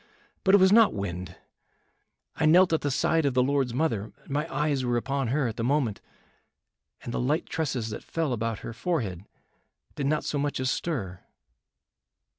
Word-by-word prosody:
But 190 Hz, +1 st, +6 dB
it -, -, +8 dB
was 190 Hz, -1 st, +5 dB
not 225 Hz, -, +6 dB
wind. 90 Hz, -2 st, -5 dB, 1.0 s
I 155 Hz, -, +2 dB
knelt 175 Hz, +2 st, +6 dB
at 160 Hz, -, +2 dB
the 145 Hz, -, -1 dB
side 160 Hz, +4 st, +1 dB
of 140 Hz, -3 st, 0 dB
the 125 Hz, -, +4 dB
Lord's 135 Hz, -2 st, +1 dB
mother, 115 Hz, -9 st, -1 dB, 0.2 s
my 150 Hz, +4 st, -2 dB
eyes 140 Hz, -1 st, 0 dB
were 120 Hz, -1 st, +1 dB
upon 135 Hz, +1 st, -1 dB
her 135 Hz, +2 st, +1 dB
at 110 Hz, -, -5 dB
the 115 Hz, -, -2 dB
moment, 125 Hz, -5 st, 0 dB, 1.0 s
and 120 Hz, -, -5 dB
the -, -, -1 dB
light 145 Hz, +7 st, 0 dB
tresses 135 Hz, -9 st, -2 dB
that -, -, -6 dB
fell 160 Hz, -5 st, -2 dB
about 115 Hz, -2 st, -2 dB
her 115 Hz, -, -5 dB
forehead 110 Hz, -, -2 dB, 0.7 s
did 140 Hz, -, -2 dB
not 155 Hz, +1 st, +1 dB
so 145 Hz, -, -2 dB
much 145 Hz, -1 st, -1 dB
as 130 Hz, 0 st, 0 dB
stir." 100 Hz, -, -3 dB
135 Hz, 180 wpm, -27 LUFS, 115-155 Hz, 1.0 s, it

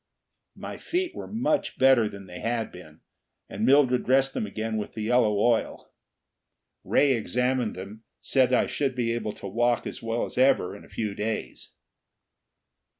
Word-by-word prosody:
My -, -, -7 dB
feet 360 Hz, +1 st, -2 dB
were -, -, -7 dB
much 290 Hz, +7 st, -1 dB
better 130 Hz, -5 st, +5 dB
than 100 Hz, -1 st, -10 dB
they 90 Hz, -1 st, -9 dB
had 115 Hz, -1 st, -2 dB
been, 80 Hz, -4 st, -14 dB, 0.5 s
and 105 Hz, -, -5 dB
Mildred 130 Hz, 0 st, +4 dB
dressed 135 Hz, +1 st, +2 dB
them 105 Hz, -, -2 dB
again 110 Hz, +2 st, -3 dB
with 105 Hz, -, -5 dB
the 110 Hz, -, -4 dB
yellow 110 Hz, -2 st, +2 dB
oil. 115 Hz, +2 st, 0 dB, 0.9 s
Ray 145 Hz, -1 st, +3 dB
examined 125 Hz, 0 st, 0 dB
them, 100 Hz, +4 st, -9 dB, 0.2 s
said 130 Hz, -2 st, +2 dB
that 125 Hz, -, +3 dB
I -, -, -2 dB
should 135 Hz, -3 st, -2 dB
be 120 Hz, -2 st, 0 dB
able 110 Hz, -3 st, -3 dB
to 100 Hz, -, -8 dB
walk 120 Hz, +4 st, +1 dB
as -, -, -6 dB
well 115 Hz, +1 st, -1 dB
as -, -, -5 dB
ever 130 Hz, -8 st, +3 dB
in 100 Hz, -, -12 dB
a -, -, -17 dB
few 105 Hz, -3 st, -3 dB
days. 110 Hz, +2 st, -5 dB
115 Hz, 170 wpm, -26 LUFS, 105-130 Hz, 0.9 s, better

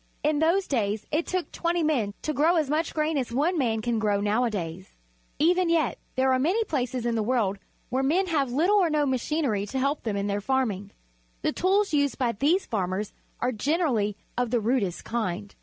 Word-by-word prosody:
In 300 Hz, 0 st, +2 dB
those 340 Hz, +5 st, +3 dB
days 215 Hz, -, -1 dB
it 310 Hz, +3 st, 0 dB
took 365 Hz, -1 st, -2 dB
twenty 340 Hz, 0 st, 0 dB
men 240 Hz, -10 st, 0 dB
to 305 Hz, -, -1 dB
grow 320 Hz, +5 st, +3 dB
as 305 Hz, -4 st, +1 dB
much 315 Hz, +2 st, 0 dB
grain 305 Hz, -1 st, 0 dB
as 250 Hz, -3 st, -3 dB
one 300 Hz, +9 st, +1 dB
man 225 Hz, -7 st, 0 dB
can 235 Hz, -1 st, 0 dB
grow 205 Hz, -2 st, +1 dB
nowadays. 205 Hz, -5 st, -2 dB, 0.4 s
E\ 325 Hz, +4 st, +4 dB
en 365 Hz, -2 st, +1 dB
yet 330 Hz, -2 st, +1 dB, 0.2 s
there 260 Hz, 0 st, +3 dB
are 255 Hz, -, +2 dB
many 365 Hz, -, +2 dB
places 255 Hz, -, -2 dB
in 235 Hz, -, +1 dB
the 225 Hz, -, 0 dB
world 210 Hz, -4 st, 0 dB, 0.3 s
where 260 Hz, +2 st, 0 dB
men 330 Hz, +8 st, +2 dB
have 290 Hz, -8 st, 0 dB
little 345 Hz, +11 st, +3 dB
or 365 Hz, -4 st, +3 dB
no 300 Hz, -1 st, +2 dB
machin 285 Hz, +4 st, 0 dB
ery 205 Hz, -5 st, 0 dB
to 265 Hz, -, -4 dB
help 275 Hz, +3 st, 0 dB
them 215 Hz, -3 st, -2 dB
in 200 Hz, -, -1 dB
their 205 Hz, 0 st, -1 dB
farming. 215 Hz, -5 st, -1 dB, 0.5 s
The -, -, +1 dB
tools 390 Hz, +1 st, +1 dB
used 285 Hz, -2 st, +2 dB
by 250 Hz, -3 st, +1 dB
these 295 Hz, -, +1 dB
farmers 195 Hz, -1 st, -2 dB, 0.3 s
are 250 Hz, -, +1 dB
generally 235 Hz, -, 0 dB, 0.2 s
of 245 Hz, -2 st, 0 dB
1 245 Hz, -, +2 dB
he 215 Hz, -, -7 dB
rudest 215 Hz, -8 st, 0 dB
kind. 205 Hz, -3 st, -3 dB
260 Hz, 210 wpm, -26 LUFS, 215-315 Hz, 0.5 s, E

